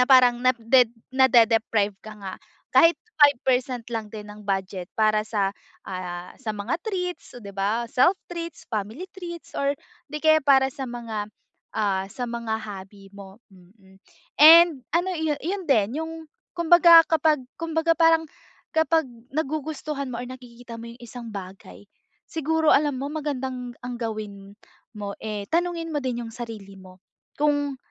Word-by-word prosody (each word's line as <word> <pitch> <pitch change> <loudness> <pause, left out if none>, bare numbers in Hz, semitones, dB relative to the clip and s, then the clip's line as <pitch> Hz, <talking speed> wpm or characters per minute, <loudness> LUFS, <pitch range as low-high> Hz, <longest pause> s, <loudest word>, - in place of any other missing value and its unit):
na - - +6
parang 250 -2 +6
na 255 - +5
de 240 +1 +4 0.2
nade-deprived 225 -5 +3
ka 215 - -9
nga. 195 -2 -6 0.3
Kahit 330 -2 +5 0.2
5% 255 -4 +2
lang 225 -3 -5
din 210 -1 -8
ng 210 0 -11
budget 190 -2 -3
para 215 -1 +2
sa, 200 -2 -1 0.3
ah, 180 -1 -6
sa 230 -4 -4
mga 210 +3 -2
treats, 360 -4 -4
'di 200 - -10
ba, 215 +4 -1
self 260 +10 +4 0.2
treats, 335 -1 -7
family 220 - -4
treats 345 -3 -8
or 280 0 +1 0.4
'di 300 - -4
kaya 315 0 +5
para 265 -2 +5
sa 270 0 -6
mga, 225 -4 -5 0.4
ah, 200 -3 0
sa 245 -1 -4
mga 230 -2 -3
hobby 195 -1 -10
mo, 200 +2 -12
mm. 190 +1 -21 0.4
And 320 -3 +8
ano 350 +3 +1
iyo 315 -2 0
yun 375 +3 -3
din 240 -4 +2
yung, 325 - -7 0.4
kumbaga 340 -1 +7
kapag, 315 -2 +3 0.2
kumbaga 330 0 0
parang, 325 -1 +4 0.5
kapag 320 -3 +2 0.2
nagugustuhan 300 -2 -3
mo 235 - -4
or 245 - -7
nakikita 245 -2 -11
mo 230 +1 -9
yung 240 - -17
isang 235 -2 -9
bagay, 195 +1 -10 0.4
siguro 320 0 0
alam 290 -2 +3
mo, 280 - -3
magandang 260 -5 -4
ang 245 0 -6
gawin 210 -4 -6 0.4
mo, 205 -1 -6
eh, 210 -2 -4
tanungin 340 0 0
mo 295 - 0
din 245 -2 -2
yung 225 - -8
sarili 220 -5 -8
mo. 185 -1 -15 0.4
Kung, 290 -2 +1
245 Hz, 155 wpm, -24 LUFS, 210-305 Hz, 0.5 s, And